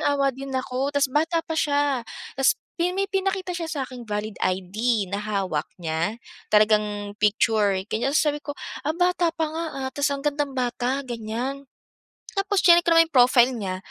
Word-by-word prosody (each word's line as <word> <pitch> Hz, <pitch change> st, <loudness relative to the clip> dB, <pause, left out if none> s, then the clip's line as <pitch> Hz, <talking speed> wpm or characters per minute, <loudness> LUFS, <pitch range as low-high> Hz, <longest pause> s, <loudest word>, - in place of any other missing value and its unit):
naawa 280 Hz, -1 st, +2 dB
din 275 Hz, +2 st, -8 dB
ako 260 Hz, +1 st, -1 dB
tapos 285 Hz, -2 st, 0 dB
bata 325 Hz, +2 st, +1 dB
pa -, -, -5 dB
siya, 290 Hz, -4 st, +1 dB, 0.3 s
tapos 270 Hz, 0 st, +3 dB, 0.2 s
pi 350 Hz, +1 st, +2 dB
may 395 Hz, -, +1 dB
pinakita 385 Hz, -1 st, -1 dB
siya 335 Hz, -2 st, -4 dB
saking 260 Hz, -4 st, -5 dB
valid 210 Hz, 0 st, -3 dB
ID 200 Hz, +4 st, 0 dB
na 200 Hz, -, -1 dB
hawak 195 Hz, -7 st, -2 dB
niya, 165 Hz, +5 st, -2 dB, 0.3 s
talagang 210 Hz, -1 st, +2 dB
picture 210 Hz, -1 st, +3 dB, 0.2 s
ganiyan. 240 Hz, +5 st, 0 dB
So 300 Hz, -2 st, +3 dB
sabi 295 Hz, -, -6 dB
ko, -, -, -6 dB, 0.3 s
"Ah, 305 Hz, -, -1 dB
bata 355 Hz, -1 st, +2 dB
pa 325 Hz, 0 st, -2 dB
nga, 320 Hz, +2 st, -4 dB, 0.2 s
ah, -, -, -1 dB
tapos 285 Hz, 0 st, +1 dB
ang 275 Hz, -, -10 dB
gandang 285 Hz, -2 st, -1 dB
bata," 250 Hz, +2 st, -1 dB
ganiyan 240 Hz, +4 st, -4 dB, 0.8 s
tapos 395 Hz, 0 st, +1 dB
chineck 345 Hz, -1 st, +7 dB
ko 340 Hz, -, +2 dB
naman 330 Hz, 0 st, +7 dB
'yung -, -, -56 dB
profile 250 Hz, 0 st, +6 dB
niya, 190 Hz, -5 st, -3 dB
265 Hz, 175 wpm, -24 LUFS, 215-305 Hz, 0.8 s, chineck